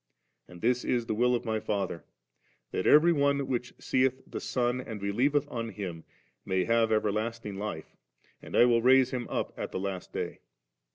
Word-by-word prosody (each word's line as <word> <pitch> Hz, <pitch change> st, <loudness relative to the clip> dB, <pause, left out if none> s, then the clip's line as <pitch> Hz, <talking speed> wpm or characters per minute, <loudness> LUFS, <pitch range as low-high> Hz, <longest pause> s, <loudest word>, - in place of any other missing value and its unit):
And 90 Hz, -1 st, -13 dB
this 125 Hz, +1 st, +2 dB
is 120 Hz, -2 st, 0 dB
the 110 Hz, -, -2 dB
will 125 Hz, +3 st, +3 dB
of 120 Hz, -, -3 dB
My 110 Hz, -1 st, 0 dB
Father, 100 Hz, -6 st, -3 dB, 0.7 s
that -, -, -1 dB
every 165 Hz, +3 st, +7 dB
one 140 Hz, -2 st, +2 dB
which 125 Hz, -2 st, -2 dB
seeth 130 Hz, 0 st, 0 dB
the -, -, -6 dB
Son 125 Hz, 0 st, 0 dB
and 110 Hz, -4 st, -7 dB
believeth 130 Hz, +9 st, +1 dB
on 115 Hz, -1 st, -3 dB
Him 90 Hz, -6 st, -6 dB, 0.4 s
may 95 Hz, -1 st, 0 dB
have 115 Hz, -1 st, +2 dB
everlasting 110 Hz, 0 st, -1 dB
life, 100 Hz, -7 st, -6 dB, 0.5 s
and -, -, -8 dB
I -, -, +8 dB
will 120 Hz, -1 st, +3 dB
raise 130 Hz, +1 st, +5 dB
him 125 Hz, -2 st, -3 dB
up -, -, -2 dB
at -, -, -5 dB
the -, -, -3 dB
last 95 Hz, -1 st, -4 dB
day'.' -, -, -4 dB
115 Hz, 180 wpm, -29 LUFS, 105-125 Hz, 0.7 s, I